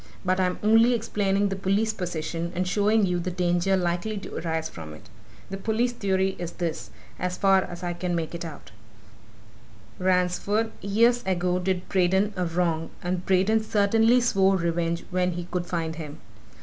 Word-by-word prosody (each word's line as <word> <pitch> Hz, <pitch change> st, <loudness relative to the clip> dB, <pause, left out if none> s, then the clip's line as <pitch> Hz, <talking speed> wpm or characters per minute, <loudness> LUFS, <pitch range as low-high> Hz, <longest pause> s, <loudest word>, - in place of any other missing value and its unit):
But 185 Hz, +1 st, +1 dB
I'm 180 Hz, -1 st, +1 dB
only 225 Hz, +3 st, +5 dB
explaining 205 Hz, -3 st, 0 dB
the 195 Hz, -, -2 dB
police 195 Hz, +3 st, 0 dB
position, 170 Hz, -3 st, -4 dB
and 180 Hz, +1 st, -1 dB
showing 210 Hz, +2 st, +3 dB
you 180 Hz, -1 st, 0 dB
the 175 Hz, +1 st, -3 dB
danger 180 Hz, +1 st, +1 dB
likely 180 Hz, +4 st, -1 dB
to 195 Hz, -, -8 dB
arise 160 Hz, -1 st, -2 dB
from 80 Hz, -2 st, -9 dB
it. -, -, -16 dB, 0.4 s
The 195 Hz, -, -3 dB
police 225 Hz, +4 st, 0 dB
theory 190 Hz, -4 st, 0 dB
is 175 Hz, -1 st, -5 dB
this, 170 Hz, -3 st, -4 dB, 0.3 s
as 180 Hz, 0 st, -2 dB
far 195 Hz, -1 st, +4 dB
as 175 Hz, -1 st, -7 dB
I 175 Hz, -1 st, -2 dB
can 175 Hz, 0 st, -2 dB
make 165 Hz, -1 st, -3 dB
it 170 Hz, -, -5 dB
out: 160 Hz, -4 st, -9 dB, 1.3 s
Ransford, 185 Hz, +4 st, +1 dB
years 230 Hz, +5 st, +3 dB
ago, 180 Hz, -1 st, +1 dB
did 185 Hz, 0 st, -2 dB
Braden 190 Hz, +2 st, +2 dB
a 180 Hz, -1 st, -1 dB
wrong, 165 Hz, -1 st, -1 dB
and 180 Hz, 0 st, -2 dB
Braden 195 Hz, +4 st, +3 dB
certainly 225 Hz, +3 st, +3 dB
swore 195 Hz, -5 st, +3 dB
revenge 170 Hz, -1 st, -1 dB
when 180 Hz, 0 st, +1 dB
he 175 Hz, 0 st, -5 dB
could 175 Hz, -1 st, -2 dB
find 165 Hz, -2 st, -2 dB
him. 150 Hz, -3 st, -7 dB
185 Hz, 170 wpm, -26 LUFS, 175-200 Hz, 1.3 s, only